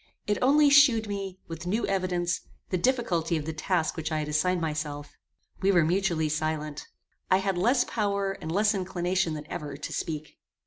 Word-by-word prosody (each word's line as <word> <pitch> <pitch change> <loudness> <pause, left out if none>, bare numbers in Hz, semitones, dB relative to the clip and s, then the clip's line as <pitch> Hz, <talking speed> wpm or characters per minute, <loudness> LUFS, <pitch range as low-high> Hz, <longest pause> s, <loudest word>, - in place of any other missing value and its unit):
It 210 - 0
only 285 +2 +5
shewed 260 -7 +6
me, 195 -2 -4
with 165 +1 -7
new 215 +6 0
evidence, 180 -3 -1 0.3
the 185 - +2
difficulty 175 -9 +1
of 150 - -4
the 160 - -3
task 160 +1 0
which 160 -1 -4
I 155 - 0
had 150 -1 -2
assigned 175 +4 +1
myself. 150 -2 -4 0.5
We 195 +1 +4
were 175 -4 +4
mutually 170 -2 +1
silent. 155 -1 -3 0.4
I 185 - +5
had 195 0 -1
less 245 +8 +3
power 200 -3 -1
and 160 -4 -6
less 210 +4 +3
inclination 180 -3 -1
than 150 0 -7
ever 145 -2 -6
to 150 - -6
speak. 155 -2 -5
180 Hz, 180 wpm, -27 LUFS, 155-200 Hz, 0.5 s, shewed